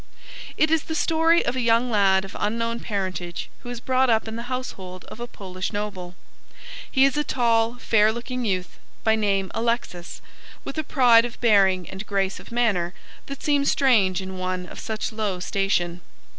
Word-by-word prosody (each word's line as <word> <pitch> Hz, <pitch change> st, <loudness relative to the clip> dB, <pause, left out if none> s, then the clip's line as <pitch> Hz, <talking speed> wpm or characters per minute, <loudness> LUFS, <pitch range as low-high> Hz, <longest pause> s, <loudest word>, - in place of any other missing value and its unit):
It 310 Hz, 0 st, +3 dB
is 320 Hz, -2 st, +2 dB
the 320 Hz, -, -4 dB
story 325 Hz, +2 st, +3 dB
of 240 Hz, -, -1 dB
a 255 Hz, -, -1 dB
young 235 Hz, +1 st, +2 dB
lad 195 Hz, -2 st, +3 dB
of 195 Hz, -, -11 dB
unknown 230 Hz, +2 st, -1 dB
parentage 185 Hz, -5 st, -4 dB
who 245 Hz, -, -10 dB
is 245 Hz, -1 st, -5 dB
brought 260 Hz, +1 st, +2 dB
up 225 Hz, -1 st, +2 dB
in 220 Hz, -, -5 dB
the 235 Hz, +2 st, -6 dB
household 190 Hz, -8 st, -6 dB
of -, -, -10 dB
a 240 Hz, -, -5 dB
Polish 185 Hz, -4 st, -6 dB
noble. 200 Hz, -4 st, -5 dB, 0.7 s
He 265 Hz, -1 st, +4 dB
is 275 Hz, +1 st, +1 dB
a 295 Hz, -, +2 dB
tall, 230 Hz, -3 st, +1 dB
fair 220 Hz, -3 st, +3 dB
looking 245 Hz, +2 st, -4 dB
youth, 185 Hz, -4 st, -2 dB, 0.2 s
by 220 Hz, 0 st, +4 dB
name 195 Hz, -3 st, 0 dB
Alexis, 230 Hz, -7 st, -2 dB, 0.4 s
with 275 Hz, -, -5 dB
a -, -, -1 dB
pride 245 Hz, -5 st, +5 dB
of 240 Hz, 0 st, -6 dB
bearing 195 Hz, -6 st, +4 dB
and 190 Hz, +3 st, -7 dB
grace 195 Hz, -1 st, -1 dB
of -, -, -14 dB
manner 205 Hz, -7 st, +1 dB, 0.3 s
that 275 Hz, -1 st, -7 dB
seem 290 Hz, -2 st, +2 dB
strange 210 Hz, -10 st, +3 dB
in 190 Hz, 0 st, -7 dB
one 185 Hz, 0 st, -2 dB
of -, -, -10 dB
such 220 Hz, -1 st, -3 dB
low 210 Hz, -4 st, -2 dB
station. 180 Hz, -2 st, -1 dB
220 Hz, 185 wpm, -24 LUFS, 190-245 Hz, 0.7 s, pride